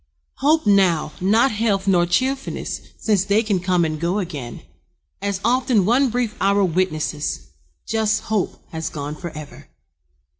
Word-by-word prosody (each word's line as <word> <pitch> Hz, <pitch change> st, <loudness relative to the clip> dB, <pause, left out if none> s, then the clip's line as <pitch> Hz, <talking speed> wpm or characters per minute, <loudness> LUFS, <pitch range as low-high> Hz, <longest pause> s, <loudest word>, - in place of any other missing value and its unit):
Hope 310 Hz, +2 st, +2 dB
now, 185 Hz, -7 st, +3 dB
not 220 Hz, +8 st, +3 dB
health 205 Hz, -3 st, 0 dB
nor 175 Hz, -3 st, +3 dB
cheerfulness, 265 Hz, +10 st, -1 dB, 0.2 s
Since 205 Hz, -4 st, +1 dB
they 205 Hz, +3 st, +2 dB
can 205 Hz, -4 st, 0 dB
come 180 Hz, -1 st, +1 dB
and 155 Hz, -1 st, -3 dB
go 170 Hz, +4 st, 0 dB
again, 150 Hz, -11 st, -5 dB, 0.6 s
As 200 Hz, -1 st, -2 dB
often 245 Hz, -4 st, +2 dB
one 250 Hz, +5 st, +3 dB
brief 235 Hz, -2 st, -1 dB
hour 200 Hz, +1 st, +3 dB
witnesses, 155 Hz, -, -2 dB, 0.4 s
Just 220 Hz, -1 st, 0 dB
hope 215 Hz, -3 st, -2 dB
has 160 Hz, -1 st, -3 dB
gone 145 Hz, 0 st, -5 dB
forever. 155 Hz, -3 st, -9 dB
195 Hz, 140 wpm, -21 LUFS, 170-220 Hz, 0.6 s, now